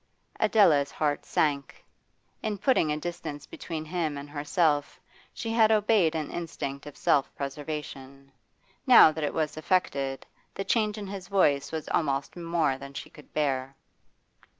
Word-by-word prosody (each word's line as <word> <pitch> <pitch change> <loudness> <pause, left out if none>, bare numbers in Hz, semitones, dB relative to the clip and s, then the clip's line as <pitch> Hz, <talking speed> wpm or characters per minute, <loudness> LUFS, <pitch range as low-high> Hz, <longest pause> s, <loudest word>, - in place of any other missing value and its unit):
Adela's 155 -10 +4
heart 145 -1 -2
sank. 140 -3 -1 0.6
In 215 -2 -2
putting 195 - +2
a 150 - -1
distance 155 -3 -6
between 160 -2 -6
him 155 -3 -2
and 140 +1 -7
herself 145 0 0 0.3
she 225 - -5
had 225 -1 +4
obeyed 210 -6 +3
an 155 -2 -3
instinct 145 -5 -5
of 145 - -10
self 140 - +2
preservation; 140 -1 -6 0.6
now 240 -10 +9
that 155 0 -5
it 145 - 0
was 155 -1 -1
effected, 140 -6 -1 0.3
the 195 - -3
change 215 -2 +1
in 210 - -5
his 195 -2 -7
voice 145 -8 +2
was 160 -1 -4
almost 140 -3 -1
more 165 -6 0
than 140 0 -10
she - - -7
could 150 - -16
bear. 135 -3 -1
155 Hz, 150 wpm, -27 LUFS, 140-175 Hz, 0.6 s, now